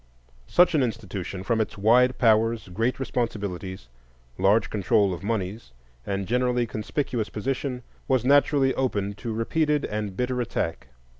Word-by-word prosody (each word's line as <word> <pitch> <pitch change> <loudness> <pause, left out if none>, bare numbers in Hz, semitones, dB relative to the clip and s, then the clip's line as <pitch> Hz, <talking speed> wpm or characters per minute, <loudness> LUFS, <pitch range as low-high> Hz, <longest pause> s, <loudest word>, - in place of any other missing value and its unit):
Such 180 - +4
an 155 - +3
institution, 100 -6 -4
from 110 +3 +1
its 110 - -4
wide 125 +5 +4
powers, 115 -2 +2
great 115 +9 -1
responsibilities, 100 - -3 0.5
large 100 +4 +3
control 100 -1 +2
of 85 - -6
moneys, 100 - -3 0.3
and 100 -1 -2
generally 125 0 +1
conspicuous 115 +1 -3
position, 125 +2 -3 0.2
was 130 -3 +1
naturally 140 -1 +4
open 100 -6 -1
to 115 +3 -6
repeated 150 +7 0
and 105 -3 -4
bitter 125 0 -1
attack. 105 -8 -3
115 Hz, 135 wpm, -25 LUFS, 100-125 Hz, 0.5 s, Such